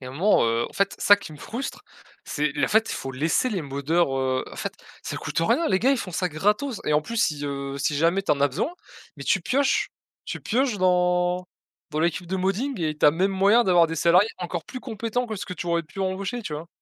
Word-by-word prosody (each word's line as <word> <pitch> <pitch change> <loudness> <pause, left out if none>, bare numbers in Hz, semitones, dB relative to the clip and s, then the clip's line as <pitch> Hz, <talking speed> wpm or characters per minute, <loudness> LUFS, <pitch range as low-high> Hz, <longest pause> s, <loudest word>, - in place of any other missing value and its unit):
Et 130 - -9
un 130 - -7
moment, 185 - +3
heu, 115 +1 +1
en - - -17
fait, 200 0 0
c'est - - -5
ça 205 - +9
qui 200 -6 -10
me 150 - -12
frustre, 245 - -5 0.4
c'est 150 -1 -1
le - - +1
fait, 220 +1 +3
il - - -2
faut 135 - -5
laisser 155 - +1
les 190 -7 -2
moddeur 140 +1 0
heu 130 -1 0
en - - -10
fait, - - -3 0.3
ça - - -5
coûte - - -4
rien 310 - +2
les 190 - +3
gars, 260 - +4
ils 275 - +3
font 185 -5 -5
ça 180 +2 0
gratos 210 - 0
et - - 0
en 150 - +4
plus, 230 +8 -6
si, 155 -10 +1
heu, 140 -1 -4
si 145 +1 0
jamais 170 +6 +2
tu - - -2
en 140 - -2
as 140 - +5
besoin 135 - -2 0.5
mais 140 - -8
tu 190 - +2
pioches. 270 +9 +1 0.4
Tu - - -5
pioches 245 0 0
dans 180 0 +2 0.4
dans 155 -1 -2
l'équipe 170 +2 0
de 190 +2 -2
modding 195 +8 -1
et 155 -2 -1
tu - - +5
as - - +8
même 185 +6 +1
moyen 200 +5 +4
d'avoir 175 -3 +5
des 165 - -5
salariés 175 +6 +4
encore 175 -2 -4
plus 255 - -7
compétents 230 +1 -3
que 220 -2 -5
ce - - -6
que 180 - -5
tu 175 - -6
aurais 170 0 +1
pu 155 +4 -14
embaucher, 195 +5 -2
tu 180 - -6
vois? 155 +3 -7
180 Hz, 255 wpm, -25 LUFS, 150-210 Hz, 0.5 s, ça